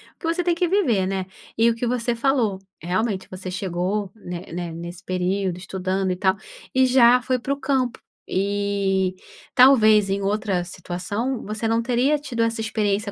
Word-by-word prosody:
o - - -50
que 325 - -4
você 335 +2 0
tem 350 0 +2
que 350 +1 0
viver, 265 - +2
né. 190 -1 -2 0.3
E 230 +1 +5
o 230 - 0
que 230 - -3
você 240 0 0
falou, 230 -6 +1 0.2
realmente, 185 +3 -1
você 185 0 -6
chegou, 185 +2 -2
né 180 -5 -7
né, 175 0 -4
nesse 170 +2 -8
período, 185 0 -1
estudando 190 +1 -2
e - - -1
tal, 190 0 +2 0.4
e 260 0 +5
já 250 -1 +6
foi 255 0 0
para 270 +3 -1
o 280 - -7
campo. 265 -3 0 0.3
E, 195 -1 0 0.4
talvez 220 -6 +6
em 195 +1 0
outra 200 -2 0
situação, 190 +8 -4
você 215 +2 -3
não 225 +1 +2
teria 255 +5 +2
tido 270 -6 -4
essa 230 0 0
experiência 210 -2 -1
205 Hz, 180 wpm, -23 LUFS, 185-245 Hz, 0.4 s, já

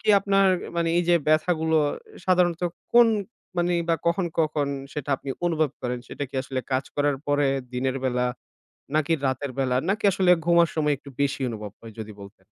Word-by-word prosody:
কি - - -6
আপনার 195 0 +3 0.3
মানি 170 -1 +1
এইযে 175 0 +3
ব্যথাগুলো 160 0 +2 0.5
সাধারণত 180 -2 +2 0.3
কোন 240 0 +8 0.5
মানি 175 0 +2
বা 165 - +4
কখন, 175 +2 +2
কখন 155 -2 +1 0.3
সেটা 145 -1 -4
আপনি 135 - -7 0.2
অনুভব 160 -4 +1
করেন? 125 -1 -2
সেটা 145 - -4
কি - - -20
আসলে 130 -1 -3
কাজ 130 +1 +1
করার 145 -1 +2
পরে, 145 0 +2 0.3
দিনের 130 +1 -1
বেলা 125 -1 +1 0.7
নাকি 155 +1 +2
রাতের 130 +1 -1
বেলা 130 -2 +1
নাকি 210 +3 0
আসলে 185 -1 +3
ঘুমার 170 -1 +5
সময় 150 -2 +2
একটু 140 - -13
বেশি 140 -1 0
অনুভব 105 -2 -6
হয় 115 -2 -11
যদি 110 -1 -7
বলতেন? 100 0 -13
150 Hz, 170 wpm, -25 LUFS, 130-170 Hz, 0.7 s, কোন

